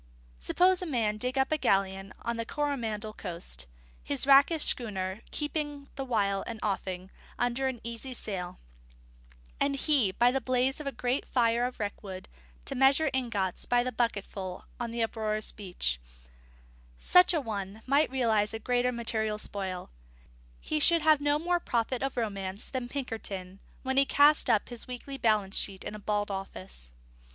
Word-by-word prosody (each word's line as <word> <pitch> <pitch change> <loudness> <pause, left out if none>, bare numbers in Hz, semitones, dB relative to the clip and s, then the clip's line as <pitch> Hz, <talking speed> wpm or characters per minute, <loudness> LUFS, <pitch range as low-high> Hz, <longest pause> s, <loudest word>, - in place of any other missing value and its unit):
Suppose 365 - +3
a 365 - -3
man 230 -8 +1
to 215 - -9
dig 255 +2 -3
up 265 +2 +2
a 310 - +2
galleon 195 -2 +1
on 235 0 -2
the 230 - -1
Coromandel 230 -6 -2
coast, 170 - -4 0.4
his 140 - -2
rakish 280 +3 +6
schooner 195 -3 -1
keeping 295 -2 -3
the 270 - -3
while 200 -6 +1
an 230 -2 -5
offing 190 -2 -3 0.3
under 250 +2 +1
easy 235 +3 -5
sail, 185 -6 -4 1.0
and 280 0 +1
he, 275 -8 +3
by 240 +5 +4
the 270 +1 0
blaze 255 +2 +1
of 300 - -6
a - - 0
great 250 +1 -1
fire 235 -1 +2
of 250 - -9
wreckwood, 195 -2 -5 0.4
to - - -2
measure 270 +3 +4
ingots 230 -8 -1
by 245 0 +3
the 255 - -2
bucketful 200 -6 -3
on 240 -1 -2
the 230 0 -1
uproarious 215 -1 -2
beach: 180 - -3 1.0
such 360 0 +6
an 320 -5 0
one 205 -1 -5
might 280 +3 +3
realise 225 -5 +1
a - - -1
greater 245 +2 +1
material 220 -3 -1
spoil; 190 - -4 0.7
he 305 - -1
should 335 +1 +6
have 310 -2 +5
no 290 0 +2
more 350 +3 +1
profit 240 -4 -1
of 270 -1 -2
romance 200 -3 -2
than 255 -2 -4
Pinkerton 200 -8 -4 0.2
when 265 0 -1
he 275 - +6
cast 290 +1 +5
up 220 -3 +3
his 240 -2 -6
weekly 260 +2 -6
balance 210 -4 +2
sheet 195 -2 -1
in 210 - -5
a 210 - -7
bald 205 0 -1
office. 95 - -7
235 Hz, 165 wpm, -29 LUFS, 200-270 Hz, 1.0 s, rakish